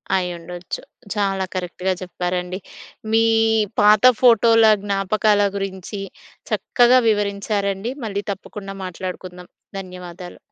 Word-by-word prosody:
అయ్యుండొచ్చు. 175 -1 -4 0.3
చాలా 195 -2 0
కరెక్ట్‌గా 185 +1 -2
చెప్పారండి. 180 0 -3 0.5
మీ 225 0 +4 0.6
పాత 210 +1 +5 0.2
ఫోటోల 230 -2 +6 0.2
జ్ఞాపకాల 205 +1 +1 0.2
గురించి 195 +1 -5 0.5
చక్కగా 250 +1 +4
వివరించారండి. 200 0 -1
మళ్ళీ 200 -1 -3
తప్పకుండా 195 0 -8
మాట్లాడుకుందాం. 180 0 -7 0.3
ధన్యవాదాలు. 180 -1 -9
195 Hz, 85 wpm, -21 LUFS, 180-210 Hz, 0.6 s, ఫోటోల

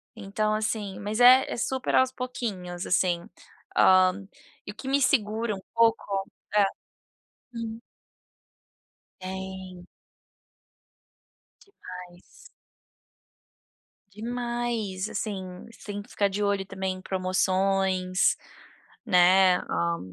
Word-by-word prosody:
então, 215 0 -1
assim, 215 -2 -2
mas 210 +3 -3
é 255 +2 +8
é - - -3
super 260 +2 -1
aos 260 0 +4
pouquinhos, 205 -9 -5
assim, 175 -2 +1 0.5
hã, 185 +1 +5 0.4
e 205 - -6
o - - -16
que 265 - -9
me 275 +1 +2
segura 220 -4 +1
um 190 - -10
pouco 225 -4 +1 0.3
Hã, 205 - +6 0.9
hum. 225 -1 -5 1.4
Tem. 190 -1 -7 1.8
Demais. 180 - -11 1.9
Demais, 235 -2 -3
assim, 185 -3 -5
você 230 - -16
tem 205 0 -5
que - - -20
ficar 200 - +1
de 200 +1 -3
olho 200 -2 0
também 190 -1 -3
em - - -10
promoções, 185 0 +1 0.7
né, 180 +1 +5
hã, 85 -1 0
195 Hz, 100 wpm, -27 LUFS, 185-225 Hz, 1.9 s, é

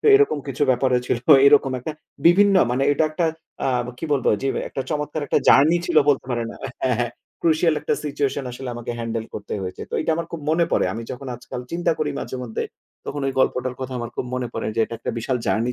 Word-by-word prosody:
তো - - -2
এরকম 415 - +4
কিছু 135 - -2
ব্যাপারও 125 0 +2
ছিল। - - +1 0.3
এরকম 140 -2 +5
একটা 155 +5 -5 0.3
বিভিন্ন 200 +3 +6 0.2
মানে 125 +2 0
এটা 155 - +2
একটা 165 +2 0 0.4
আ - - +2 0.3
কি - - -5
বলবো 135 -4 +2
যেম 135 - 0
একটা 135 - -4
চমৎকার 150 0 -2
একটা - - +2
জার্নি 155 +5 +6
ছিল 170 - -1
বলতে 135 -3 +2
পারেন 120 -2 -1 0.3
হ্যাঁ, 125 -3 +2
হ্যাঁ 120 -1 0 0.3
ক্রুশিয়াল 160 0 +3
একটা - - 0
সিচুয়েশন 140 -1 -1
আসলে 130 +1 -7
আমাকে 120 0 -5
হ্যান্ডেল 115 -1 -3
করতে 105 - -6
হয়েছে। 90 0 -5
তো - - -4
এইটা - - 0
আমার 170 0 -3
খুব 170 - -5
মনে 165 +2 +3
পড়ে। - - +3
আমি 115 - -5
যখন 130 +2 -8
আজকাল 125 0 -7
চিন্তা 170 0 +1
করি 150 -1 0
মাঝে - - -5
মধ্যে 115 -3 -3 0.4
তখন 145 - -4
ঐ - - +1
গল্পটার 125 0 0
কথা 130 0 -4
আমার 120 -1 -5
খুব - - -2
মনে 125 -1 -2
পড়ে - - -3
যে 115 - +1
এটা 115 - -7
একটা - - -3
বিশাল 125 +3 -1
জার্নি 115 +3 +1
135 Hz, 220 wpm, -22 LUFS, 125-155 Hz, 0.4 s, বিভিন্ন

